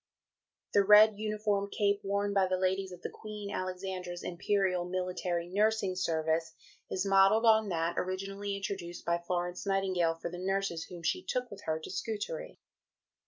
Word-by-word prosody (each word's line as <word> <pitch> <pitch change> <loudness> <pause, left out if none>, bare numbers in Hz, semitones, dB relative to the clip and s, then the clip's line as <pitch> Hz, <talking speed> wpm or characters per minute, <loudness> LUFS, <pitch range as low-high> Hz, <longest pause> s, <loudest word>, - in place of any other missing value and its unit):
"The 200 - +5
red 210 +1 +7
uniform 210 -2 -1
cape 200 0 +1
worn 200 +1 0
by 195 -1 +3
the 185 0 0
ladies 190 +1 0
of 180 -1 -11
the - - -3
Queen 210 -2 -7
Alexandra's 185 -1 -4
Imperial 185 0 0
Military 180 -1 -2
Nursing 205 0 +1
Service 160 -2 0 0.4
is 185 +1 -1
modelled 195 +3 +5
on 220 -2 +5
that 170 -1 0
originally 195 +2 -3
introduced 190 -3 -5
by 170 0 +1
Florence 175 +1 -3
Nightingale 185 -4 +1
for 165 +1 -6
the 175 - -6
nurses 195 -3 -1
whom 175 -2 -10
she 365 - 0
took 250 -1 -2
with 200 0 -9
her 160 0 0
to 160 - -8
Scutari. - - -4
190 Hz, 160 wpm, -31 LUFS, 175-205 Hz, 0.4 s, red